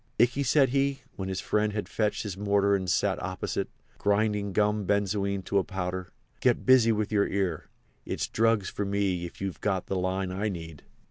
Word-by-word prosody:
"Ikey," 125 +4 +3
said 135 0 +4
he, 140 +1 0
when 95 -1 -4
his 95 -1 -2
friend 105 0 +1
had 105 -1 -3
fetched 105 -1 -1
his 100 -4 -4
mortar 100 0 +2
and 95 -2 -2
sat - - +1
opposite, - - -3 0.3
grinding 105 0 +1
gum 105 0 +1
benzoin 100 -1 0
to 100 +2 +1
a - - 0
powder, 90 -1 -4 0.3
"get - - +2
busy 125 -3 +6
with 110 -1 -1
your 100 -1 +3
ear. 95 -5 -1 0.4
It's - - -2
drugs 115 -3 +2
for 105 - -3
me 100 -3 0
if 85 - -10
you've 95 -1 -4
got 95 -3 0
the 95 - -3
line 95 +1 -1
I 100 +3 -1
need." 80 -5 -7
100 Hz, 190 wpm, -28 LUFS, 95-105 Hz, 0.4 s, busy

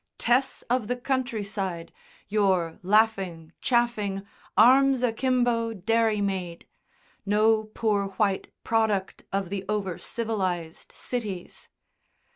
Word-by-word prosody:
Tess 260 +2 +1
of 245 -3 0
the 245 - 0
countryside, 215 -9 -3 0.3
your 190 -6 +1
laughing, 190 -5 +1
chaffing, 215 -5 0 0.3
arms 265 +1 +6
akimbo 240 -1 +1
dairymaid; 200 -4 0 0.6
no 215 +2 +3
poor 215 -2 0
white 195 0 -1
product 220 -4 0
of 195 -2 -2
the 195 -1 -3
over 195 -5 -2
civilised 185 -8 -3
cities. 210 -8 -6
210 Hz, 90 wpm, -26 LUFS, 195-230 Hz, 0.6 s, arms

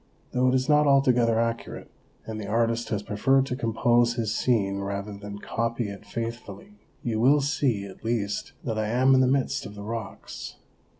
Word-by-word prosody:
Though 125 0 +2
it 130 - +3
is 130 0 +1
not 150 0 +4
altogether 125 -5 +4
accurate, 115 0 -3 0.3
and 110 -1 -5
the 100 - -6
artist 115 +1 0
has 105 -2 -2
preferred 135 +7 +2
to 125 - -3
compose 120 -1 +2
his 110 -3 -1
scene 100 -6 +1
rather 100 +1 -4
than 100 0 -8
copy 115 +1 -2
it 100 +1 -10
faithfully, 115 - -6 0.2
you 110 -2 -1
will 135 +6 +5
see 135 -8 0
at 95 +2 -12
least 110 -3 -2
that 110 -4 -2
I 110 - 0
am 130 +4 +4
in 130 - +5
the 130 - +4
midst 135 +1 0
of 105 - -11
the 100 - -8
rocks. 110 -1 -6
115 Hz, 185 wpm, -26 LUFS, 105-130 Hz, 0.3 s, will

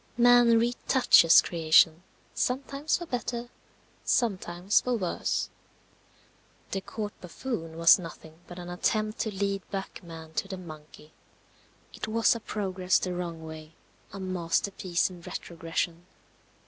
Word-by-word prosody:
Man 240 -1 +6
retouches 240 -6 +5
creation, 160 0 +4 0.3
sometimes 275 +4 -1
for 345 - -7
better, 245 -3 -4 0.5
sometimes 190 -4 +1
for 250 -1 -1
worse. 180 -5 -2 1.2
The 195 - -2
Court 210 +1 -5
buffoon 170 -3 -5
was 165 +3 +7
nothing 160 -2 -10
but 175 - -10
an 175 -1 -7
attempt 215 +4 -1
to 220 - -1
lead 200 0 -1
back 195 -1 -5
man 165 -2 -11
to 195 - -2
the 190 -1 -6
monkey. 155 -3 -12 0.8
It - - -5
was 225 +1 +3
a 230 - -5
progress 190 -4 0
the 180 - -2
wrong 170 -2 -5
way. 160 0 -10 0.4
A 200 - -8
masterpiece 185 0 -1
in 175 -1 -12
retrogression. 170 +1 -4
185 Hz, 125 wpm, -28 LUFS, 165-220 Hz, 1.2 s, was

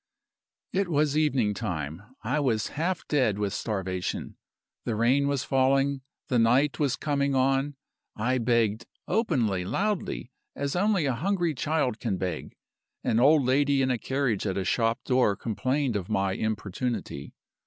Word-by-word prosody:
"It 195 0 +1
was 150 -3 +1
evening 135 -9 +2
time. 80 -3 -4 0.2
I 130 +7 0
was 115 -7 0
half 170 +4 -2
dead 130 -9 +2
with 100 -1 -1
starvation; 95 -4 -3 0.5
the 115 - -2
rain 130 +6 +3
was 140 -2 0
falling; 135 +1 +2 0.3
the 125 - +2
night 125 +4 +3
was 140 -4 +1
coming 140 -2 0
on. 135 +2 +1 0.4
I 125 +4 0
begged 115 -2 +1 0.2
openly, 115 - +1
loudly, 190 - -2 0.2
as 140 +2 -2
only 195 -3 +2
a 135 - +1
hungry 175 +4 0
child 140 -4 0
can 105 -6 -1
beg. 90 -4 -4 0.5
An 115 - +2
old 140 +2 +5
lady 140 +1 +3
in 130 - +1
a 125 - 0
carriage 130 -7 -1
at 95 - -1
a 95 - -1
shop 115 +4 +1
door 125 -5 +2
complained 130 +4 -1
of 95 -3 -3
my 95 0 +1
importunity. 110 +3 -3
130 Hz, 150 wpm, -27 LUFS, 110-145 Hz, 0.5 s, old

